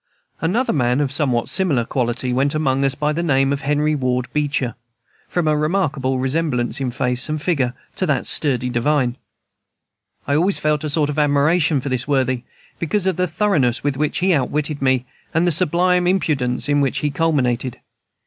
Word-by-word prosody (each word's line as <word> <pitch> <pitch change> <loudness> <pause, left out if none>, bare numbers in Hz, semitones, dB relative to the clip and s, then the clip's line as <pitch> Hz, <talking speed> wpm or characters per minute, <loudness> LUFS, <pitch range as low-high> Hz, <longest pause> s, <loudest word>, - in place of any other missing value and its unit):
Another 210 - +1
man 125 -2 +1
of 140 -3 0
somewhat 135 -5 0
similar 150 -12 +1
quality 125 0 -1
went 140 +3 +1
among 135 -3 +1
us 135 -1 +1
by 150 +1 0
the 165 - -2
name 135 -4 +2
of 140 - -3
Henry 150 +2 +1
Ward 125 -3 -1
Beecher, 140 -5 -1 0.6
from 175 -3 -1
a 155 - +3
remarkable 150 -5 0
resemblance 130 -2 0
in 130 - -1
face 125 +3 0
and 155 0 -1
figure 140 -6 0 0.2
to - - 0
that - - 0
sturdy 125 -4 +1
divine. 125 0 +1 1.1
I 140 - -1
always 180 +7 +2
felt 150 -1 0
a 155 - -2
sort 150 0 +1
of 150 - -3
admiration 150 +1 +2
for 140 - -4
this 130 0 -1
worthy, 130 -3 +1 0.4
because 190 +4 -1
of 190 - +1
the 180 0 +1
thoroughness 160 - +1
with 145 -1 0
which 150 +2 -1
he 185 +1 +2
outwitted 150 0 -1
me, 130 -2 +2 0.3
and 165 +2 +3
the 175 - +2
sublime 180 +2 +2
impudence 145 -10 0
in 145 0 +2
which 135 -2 0
he 145 - +1
culminated. 130 -5 0
145 Hz, 180 wpm, -20 LUFS, 130-155 Hz, 1.1 s, a